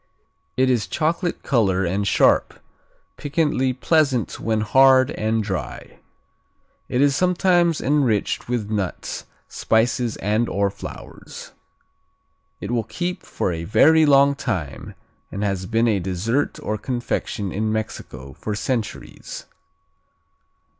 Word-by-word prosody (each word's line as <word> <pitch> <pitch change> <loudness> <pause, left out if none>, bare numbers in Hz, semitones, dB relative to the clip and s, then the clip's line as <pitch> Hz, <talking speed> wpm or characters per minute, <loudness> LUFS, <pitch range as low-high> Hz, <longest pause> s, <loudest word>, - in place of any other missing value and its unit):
It 130 0 +3
is 120 -4 0
chocolate 170 +2 -1
color 95 -7 +1
and 100 +4 -1
sharp, - - +3 0.6
piquantly 145 -3 0
pleasant 135 -1 +1
when 110 -1 0
hard 130 +3 +5
and 110 +1 -1
dry. 95 -3 -6 0.9
It 125 - +1
is 140 -1 +3
sometimes 175 -1 +2
enriched 130 -7 0
with 110 -4 -2
nuts, 100 -4 -3 0.2
spices 115 +1 0
and/or 105 -1 0
flowers. - - -10 1.1
It - - -5
will 115 -3 0
keep 175 +8 -4
for - - -3
a 85 -1 -4
very 155 - +5
long 140 0 +5
time 95 - -4 0.4
and 100 - -4
has 95 -2 -2
been 115 +1 +2
a 105 -4 +2
dessert 95 +9 -1
or 105 0 -2
confection 120 -5 -3
in 110 +2 -1
Mexico 105 -11 -5
for 105 +9 -5
centuries. 110 -1 -4
115 Hz, 115 wpm, -22 LUFS, 100-140 Hz, 1.1 s, hard